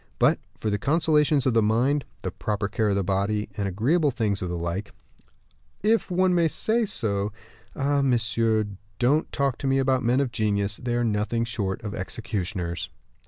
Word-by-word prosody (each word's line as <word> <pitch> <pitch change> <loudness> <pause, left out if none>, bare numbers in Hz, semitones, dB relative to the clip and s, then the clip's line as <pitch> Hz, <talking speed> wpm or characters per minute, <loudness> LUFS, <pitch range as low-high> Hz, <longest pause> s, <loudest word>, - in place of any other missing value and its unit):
But - - +4 0.2
for 110 - -2
the 100 - 0
consolations 150 - +3
of 130 - +3
the 115 - +4
mind, 125 +7 +2 0.2
the - - -2
proper 105 -1 -2
care 105 +1 0
of 100 - +1
the 100 - +1
body, 100 +3 0
the 100 -1 -2
agreeable 140 - +2
things 110 -6 -1
of 90 - -2
like, 85 +4 -3 0.9
if 220 +1 +2
one 185 0 +3
may 170 -2 +4
say 225 +8 +1
so 100 - -1 0.4
ah! 140 0 +1
monsieur, 115 -4 +2 0.3
don't 140 +6 +2
talk 140 -3 0
to 140 - -2
me 135 0 +3
about 130 -1 +2
men 125 +1 +2
of 135 -3 0
genius; 105 -3 0
they 120 -1 -1
are 120 - +1
nothing 110 +1 0
short 105 -4 -3
of 105 -2 -4
executioners." 95 -3 -4
115 Hz, 175 wpm, -25 LUFS, 100-140 Hz, 0.9 s, But